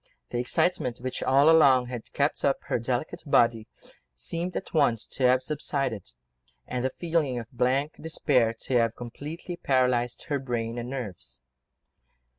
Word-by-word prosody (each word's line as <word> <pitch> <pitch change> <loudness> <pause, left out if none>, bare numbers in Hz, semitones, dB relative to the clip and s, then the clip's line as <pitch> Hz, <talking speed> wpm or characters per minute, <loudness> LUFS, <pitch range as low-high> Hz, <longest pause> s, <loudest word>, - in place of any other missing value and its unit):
The 120 - -1
excitement 125 -1 0
which 130 +1 -4
all 140 +3 +4
along 140 -6 +6
had 120 -2 -7
kept 140 +1 0
up 140 - +3
her - - -1
delicate 125 +4 -2
body 115 -6 +3 0.5
seemed 170 - -3
at - - -7
once 130 -8 +2
to 130 - +1
have 130 +1 +3
subsided, 135 - -3 0.5
and 125 -1 -3
the 130 - +1
feeling 160 -3 -1
of 115 -1 -7
blank 130 +5 0
despair 135 -7 +2
to 130 - +1
have 115 -1 +1
completely 150 +8 -7
paralysed 125 -4 +1
her 145 -3 -2
brain 120 -2 -3
and 120 +1 -5
nerves. 100 - -6
130 Hz, 150 wpm, -27 LUFS, 120-145 Hz, 0.5 s, along